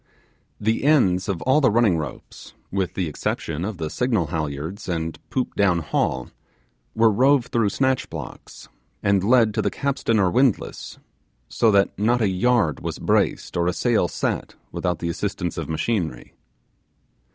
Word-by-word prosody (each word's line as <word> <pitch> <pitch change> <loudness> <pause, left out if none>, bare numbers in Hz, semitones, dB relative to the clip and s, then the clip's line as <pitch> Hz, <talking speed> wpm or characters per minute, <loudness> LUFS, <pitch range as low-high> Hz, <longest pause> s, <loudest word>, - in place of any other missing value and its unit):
The 110 +3 0
ends 100 -12 +3
of 95 -4 -2
all 130 +4 +3
the 135 - +5
running 110 -4 +3
ropes, 75 -5 -7 0.2
with 95 -2 -2
the 90 -3 -1
exception 80 +1 -3
of 100 0 -4
the 80 - -3
signal 115 -1 0
halyards 80 +6 -4
and 80 -2 -3
poop 130 -2 -2
down 95 -4 +2
haul, 80 -3 -1 0.7
were 110 0 +4
rove 130 +3 +3
through 115 -3 +2
snatch 130 +4 0
blocks, - - -9 0.4
and 100 -1 +2
led 115 0 +4
to - - 0
the - - 0
capstan 135 -5 -1
or 95 -4 +3
windlass, 130 -1 0 0.5
so 115 - +2
that 100 -2 +3
not 120 +4 +2
a 110 -4 +2
yard 95 - +1
was - - -5
braced - - 0
or 85 0 +1
a 90 - +1
sail 115 -3 +1
set - - -3 0.2
without 90 -2 -2
the 85 +1 -3
assistance 90 -1 -3
of 80 -2 -5
machinery. 80 - -2
100 Hz, 160 wpm, -23 LUFS, 85-120 Hz, 0.7 s, the